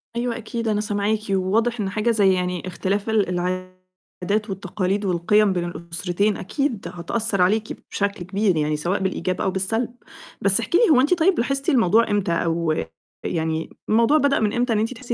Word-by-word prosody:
أيوه 235 -1 -1
أكيد، 230 0 -4
أنا 210 -1 +1
سامعاكِ، 210 0 0
وواضح 215 +5 +1
إن 200 -2 -1
حاجة 215 +4 0
زَي 200 -4 +4
يعني 180 -1 -2
اختلاف 195 +4 -2
ال 215 -4 +2
العادات 185 +3 -4
والتقاليد، 195 +1 -2
والقِيَم 195 +3 +2
بين 175 -1 -1
الأسرتين 175 +4 -1
أكيد 245 +1 -2
هتأثّر 195 +3 -1
عليكِ 210 +4 +1
بشكل 200 -2 -2
كبير 195 -1 +1
يعني، 150 0 0
سواء 175 +6 -1
بالإيجاب 185 -1 -2
أو 190 - +1
بالسَلْب، 225 +6 -1 0.5
بس 200 +1 +4
احكي 235 +9 +1
لي - - +4
هو 265 -5 +6
أنتِ 290 +7 +3
طيب 355 +1 +3
لاحظتِ 275 +5 0
الموضوع 230 - +3
إمتى؟ 205 -4 0
أو 165 -1 0 0.5
يعني 160 0 -2 0.2
الموضوع 230 +7 +4
بدأ 285 -2 +2
من 210 -2 0
إمتى، 240 -1 +1
إن 215 - +1
أنتِ 225 +4 -1
تحسّي 245 -1 -5
200 Hz, 175 wpm, -22 LUFS, 185-230 Hz, 0.5 s, هو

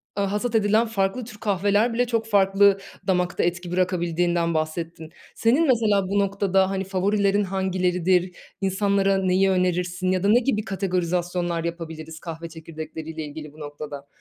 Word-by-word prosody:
aaa, 200 -1 0
hasat 225 +3 -1
edilen 215 +2 +3
farklı 205 +2 -1
tür 215 -2 -11
kahveler 205 +3 +1
bile 245 +1 +1
çok 230 -2 -1
farklı 200 -1 +4 0.3
damakta 180 -2 +1
etki 175 0 -2
bırakabildiğinden 175 -2 0
bahsettin. 160 0 -3 0.3
Senin 270 +8 +3
mesela 210 -6 +3
bu 200 +2 +1
noktada, 195 -1 +2
hani, 195 0 -2
favorilerin 200 +2 +1
hangileridir, 185 -1 0 0.3
insanlara 195 0 +2
neyi 190 +1 +2
önerirsin 180 0 0
ya 185 0 0
da - - +2
ne 235 - +6
gibi 235 -4 0
kategorizasyonlar 180 -2 -1
yapabiliriz 160 -1 -6
kahve 165 0 -7
çekirdekleriyle 160 0 -7
ilgili 150 0 -9
bu 155 - -16
noktada? 145 -1 -8
185 Hz, 145 wpm, -24 LUFS, 170-200 Hz, 0.3 s, ne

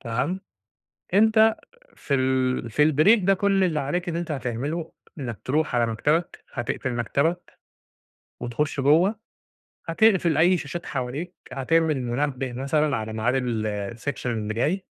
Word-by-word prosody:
تمام. 130 +10 -2 0.7
أنت 220 +2 +5 0.4
في 140 - -4
ال 130 -2 +1
في 150 +6 +4
الbreak 190 +9 +5
ده، 195 - +5
كل 195 0 +2
اللي 165 -4 +1
عليك 175 +6 -2
إن 165 - -3
أنت 170 -1 -3
هتعمله 140 +5 -3 0.3
إنك 120 -5 -5
تروح 150 0 0
على 120 -1 +3
مكتبك، 150 +10 -1
هتقفل 120 +1 -3
مكتبك 140 +9 -1 0.8
وتخش 130 +4 -2
جوه، 160 +9 +4 0.7
هتقفل 175 -2 +3
أي 175 +4 +5
شاشات 170 +2 -6
حواليك، 140 +7 -4 0.2
هتعمل 155 +4 +1
المنبه 130 +1 -2
مثلًا 140 +2 0
على 110 -1 -4
معاد 110 +3 0
ال 110 -4 -2
الsection 130 +3 -5
اللي 110 -3 -2
جاي. 165 - 0
145 Hz, 135 wpm, -24 LUFS, 125-170 Hz, 0.8 s, أنت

